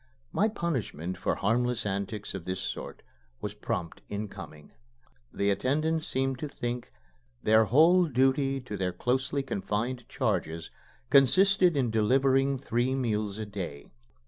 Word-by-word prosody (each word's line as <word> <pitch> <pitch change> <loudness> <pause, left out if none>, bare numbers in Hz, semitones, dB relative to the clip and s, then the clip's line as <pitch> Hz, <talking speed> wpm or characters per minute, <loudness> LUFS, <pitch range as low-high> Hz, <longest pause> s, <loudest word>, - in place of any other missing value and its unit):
My 215 - +3
punishment 125 - -3
for - - 0
harmless 120 +2 0
antics 100 +1 -3
of 95 -4 -6
this 95 0 -3
sort - - -6 0.4
was 105 - -4
prompt 105 -5 -4
in 105 +1 -4
coming. 80 -7 -11 0.6
The 100 0 +1
attendants 155 +9 0
seemed 135 0 -1
to 150 - -3
think 120 -2 -4 0.5
their 110 +1 +5
whole 165 - +5
duty 135 0 +2
to 115 -5 -6
their 90 -2 -1
closely 130 +7 0
confined 115 +2 -3
charges 80 +1 -2 0.4
consisted 180 +5 +5
in 125 -4 +1
delivering 135 +5 +3
three 125 0 0
meals 110 -5 -1
a 110 - -4
day. 90 -8 -7
120 Hz, 135 wpm, -29 LUFS, 100-135 Hz, 0.6 s, their